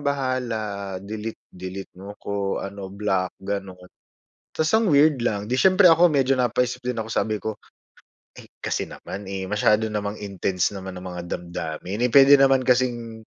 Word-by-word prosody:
bahala, 120 Hz, -8 st, -2 dB
delete 110 Hz, +2 st, -6 dB
delete 95 Hz, +1 st, -8 dB
mo 100 Hz, +1 st, -9 dB
ko, 100 Hz, -1 st, -3 dB
ano 100 Hz, -1 st, -6 dB
block." 95 Hz, -2 st, -2 dB
gano'n. 95 Hz, -1 st, -5 dB, 0.8 s
Ta's 160 Hz, 0 st, 0 dB
ang 220 Hz, -6 st, +2 dB
weird 145 Hz, -3 st, +4 dB
lang, 105 Hz, -3 st, -1 dB
'di 125 Hz, -, 0 dB
siyempre 185 Hz, +6 st, +6 dB
ako 170 Hz, 0 st, +6 dB
medyo 135 Hz, -2 st, +2 dB
napaisip 125 Hz, 0 st, 0 dB
din 125 Hz, -2 st, -2 dB
ako, 110 Hz, -, -4 dB
sabi 110 Hz, -1 st, -1 dB
ko, 110 Hz, 0 st, -4 dB, 0.8 s
"Eh, -, -, -11 dB, 0.2 s
kasi -, -, -2 dB
naman, 100 Hz, +1 st, -8 dB
eh, 95 Hz, -1 st, -4 dB
masyado 105 Hz, +1 st, +2 dB
namang 105 Hz, 0 st, -4 dB
intense 100 Hz, -1 st, -1 dB
naman 95 Hz, 0 st, -7 dB
ang 90 Hz, -, -7 dB
mga 90 Hz, -1 st, -6 dB
damdamin, 85 Hz, +4 st, -4 dB
eh, 125 Hz, -, +2 dB
puwede 140 Hz, 0 st, +8 dB
naman 135 Hz, -1 st, +4 dB
kasing 120 Hz, -3 st, 0 dB
110 Hz, 160 wpm, -24 LUFS, 100-130 Hz, 0.8 s, puwede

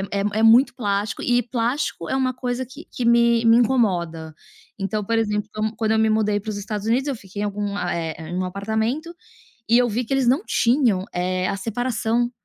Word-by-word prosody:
é 200 Hz, -, 0 dB, 0.2 s
é -, -, +2 dB
muito 245 Hz, +4 st, +6 dB
plástico 205 Hz, -3 st, -2 dB
e 245 Hz, 0 st, +2 dB
plástico 235 Hz, -, -2 dB
é 265 Hz, -, 0 dB
uma 260 Hz, -1 st, +1 dB
coisa 250 Hz, 0 st, -3 dB
que 280 Hz, +6 st, -12 dB
que 245 Hz, -, -4 dB
me 235 Hz, 0 st, +4 dB
me 230 Hz, +1 st, +6 dB
incomoda. 175 Hz, -10 st, 0 dB, 0.4 s
Então, 200 Hz, +1 st, -2 dB
por 230 Hz, +2 st, 0 dB
exemplo, 210 Hz, -1 st, -1 dB
qua 215 Hz, -, -3 dB
quando 220 Hz, -1 st, 0 dB
eu 220 Hz, -, +2 dB
me 220 Hz, 0 st, +3 dB
mudei 210 Hz, -1 st, +1 dB
para 215 Hz, -, -6 dB
os 205 Hz, -, -4 dB
Estados 210 Hz, +1 st, -5 dB
Unidos, 255 Hz, +5 st, +1 dB
eu 280 Hz, -, -1 dB
fiquei 205 Hz, -2 st, -7 dB
em -, -, 0 dB
algum 205 Hz, 0 st, -3 dB
eh, 170 Hz, -3 st, -2 dB, 0.2 s
em -, -, -5 dB
um 185 Hz, -, -1 dB
apartamento 220 Hz, -, -2 dB, 0.5 s
e 235 Hz, -, +5 dB
eu 245 Hz, -1 st, +3 dB
vi 230 Hz, +3 st, -1 dB
que 270 Hz, -, -2 dB
eles 270 Hz, -2 st, +1 dB
não 270 Hz, +10 st, +3 dB
tinham, 235 Hz, -6 st, +2 dB
eh, 185 Hz, +1 st, -1 dB
a 195 Hz, -, -1 dB
separação 235 Hz, +2 st, -1 dB
220 Hz, 210 wpm, -22 LUFS, 200-245 Hz, 0.5 s, muito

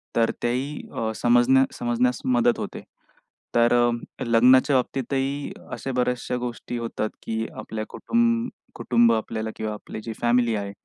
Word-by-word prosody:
तर 115 Hz, -1 st, +3 dB
त्याही 130 Hz, +5 st, -2 dB
अ, 110 Hz, -1 st, -2 dB
समजण्या 120 Hz, +2 st, +4 dB
समजण्यास 120 Hz, +1 st, 0 dB
मदत 120 Hz, -1 st, +3 dB
होते. -, -, -5 dB, 0.7 s
तर 120 Hz, 0 st, +4 dB
अ, 120 Hz, -1 st, 0 dB
लग्नाच्या 125 Hz, +4 st, +5 dB
बाबतीतही 135 Hz, +2 st, -1 dB, 0.2 s
अशा 135 Hz, -, -4 dB
बऱ्याचशा 125 Hz, 0 st, 0 dB
गोष्टी 120 Hz, 0 st, -5 dB
होतात 115 Hz, -2 st, -3 dB
की 110 Hz, 0 st, -2 dB
आपल्या 110 Hz, 0 st, -5 dB
कुटुंब 235 Hz, 0 st, +1 dB, 0.3 s
कुटुंब 120 Hz, -1 st, +3 dB
आपल्याला 110 Hz, 0 st, -2 dB
किंवा 110 Hz, -1 st, -3 dB
आपली 105 Hz, +1 st, -8 dB
जी 115 Hz, -, -5 dB
फॅमिली 120 Hz, -1 st, +3 dB
आहे 100 Hz, -1 st, -3 dB
120 Hz, 140 wpm, -24 LUFS, 115-130 Hz, 0.7 s, लग्नाच्या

